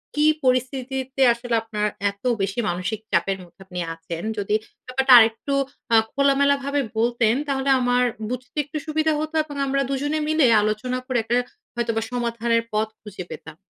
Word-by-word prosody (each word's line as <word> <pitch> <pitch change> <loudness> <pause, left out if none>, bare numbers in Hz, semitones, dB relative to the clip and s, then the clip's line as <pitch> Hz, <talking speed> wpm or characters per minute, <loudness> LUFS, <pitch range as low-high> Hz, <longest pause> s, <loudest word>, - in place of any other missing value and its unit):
কি 300 +1 +3 0.2
পরিস্থিতিতে 260 +1 -1
আসলে 235 0 -2
আপনার 210 -2 -2 0.2
এত 200 +3 -25 0.2
বেশি 195 +4 -1
মানসিক 180 +4 -2
চাপের 190 +3 +1
মধ্যে 175 +2 -19
আপনি 180 -2 -6
আছেন 165 +1 -7
যদি 205 +1 0 0.3
ব্যাপারটা 265 +1 +1
আরেকটু 225 +5 +2 0.4
আ - - +7 0.2
খোলামেলাভাবে 280 0 +2 0.2
বলতেন 235 0 +2
তাহলে 275 0 -1
আমার 245 0 +2 0.3
বুঝতে 250 +3 -6
একটু 305 +1 -6
সুবিধা 310 0 +1
হতো 310 +1 -4
এবং 290 -2 -10
আমরা 275 0 +1
দুজনে 290 +3 -1
মিলে 310 -3 +3 0.2
আলোচনা 215 +4 -1
করে 255 -2 -1
একটা 235 +2 0 0.4
হয়তোবা 230 -1 -1
সমাধানের 235 -1 0
পথ 215 +1 +1
খুঁজে 200 -3 -8
পেতাম। 160 0 -9
245 Hz, 155 wpm, -23 LUFS, 215-275 Hz, 0.4 s, আ